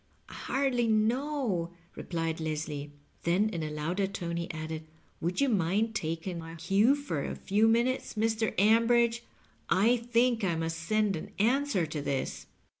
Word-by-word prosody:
"I - - -11
hardly 260 -3 0
know," 220 - 0 0.2
replied 165 -2 -3
Leslie. 150 -2 -3 0.3
Then 185 +6 +2
in 170 -6 -4
a 155 - -3
louder 165 +6 -1
tone 175 -3 -4
he 170 0 -3
added, 160 -1 -5 0.3
"Would 175 +2 -2
you 280 - +4
mind 210 +1 +1
taking 170 -1 -3
my 165 0 -8
cue 195 - +3
for 280 - -3
a - - -4
few 210 +3 +2
minutes, 235 +3 +1
Mr. 220 0 0
Ambridge? 230 +3 +4 0.5
I 215 +8 +4
think 235 0 +1
I 175 -4 +1
must 165 0 -2
send 210 +3 +1
an 160 - -6
answer 240 - +2
to 155 -1 -4
this." 140 -1 -3
195 Hz, 155 wpm, -30 LUFS, 165-230 Hz, 0.5 s, you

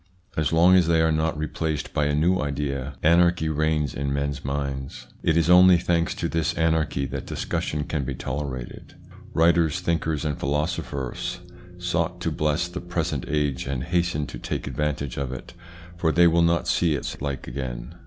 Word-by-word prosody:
As 80 - 0
long 85 +3 +6
as 90 -3 +4
they 85 -1 +3
are 80 0 +3
not 80 0 0
replaced 80 0 -3
by 75 - +1
a 75 - +1
new 90 +5 +2
idea, 70 -1 -3
anarchy 85 0 +4
reigns 75 -2 0
in 70 0 -2
men's 70 -1 -2
minds. 70 -1 -4 0.2
It 80 - +2
is 85 -1 +3
only 90 0 +8
thanks 85 -1 0
to - - -2
this 80 -1 -1
anarchy 80 -4 +1
that - - -5
discussion 75 0 -2
can 75 -1 -2
be - - -4
tolerated. 65 -3 -5 0.4
Writers, 85 0 +3
thinkers, 80 -3 -1
and 75 -2 -2
philosopher 75 -2 -2 0.6
sought 90 0 -1
to 80 - -1
bless 75 +3 0
the 90 +1 -6
present 85 -5 -2
age 75 -3 -1
and 65 -2 -2
hasten 85 -2 0
to - - -8
take - - -4
advantage 75 -3 -2
of 70 -2 -2
it, 65 +7 -8 0.4
for 80 -2 +2
they 85 +2 +5
will 85 0 +4
not 85 0 +2
see 85 -4 +2
its 70 - -5
like 70 -2 -4
again. - - -5
75 Hz, 175 wpm, -25 LUFS, 70-85 Hz, 0.6 s, only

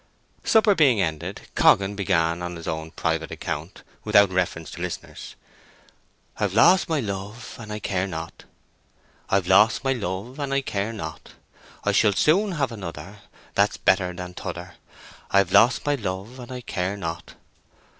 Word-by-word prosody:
Supper 220 -2 +5
being 135 - +4
ended, 80 -5 -2
Coggan 100 +1 +4
began 85 -4 +1
on 90 0 -4
his 85 - -9
own 80 0 -3
private 80 -1 -2
account, - - -6 0.2
without 100 -2 +5
reference 85 -4 -1
to 85 - -8
listeners:— 90 -1 -6 1.0
I've 105 -2 0
lost 175 +11 +5
my 160 -2 +1
love, 105 +1 -6
and 110 -2 -8
I 105 - -3
care 95 -2 -1
not, 80 -2 -7 0.8
I've 95 -2 +2
lost 105 +8 +4
my 135 0 +2
love, 110 +4 -5
and 140 -1 -3
I 140 - +2
care 105 -4 -2
not; 80 -8 -8 0.5
I - - +2
shall 105 - +4
soon 190 - +3
have 140 -6 -1
another 95 -2 -8 0.3
That's - - +2
better 90 -1 +2
than 90 0 -7
t'other; - - -7 0.6
I've 100 -2 +3
lost 110 +5 +5
my 145 - +2
love, 105 0 -4
and 125 0 -9
I 125 -1 -5
care 95 -3 -3
not. 85 -2 -6
100 Hz, 155 wpm, -24 LUFS, 90-120 Hz, 1.0 s, Supper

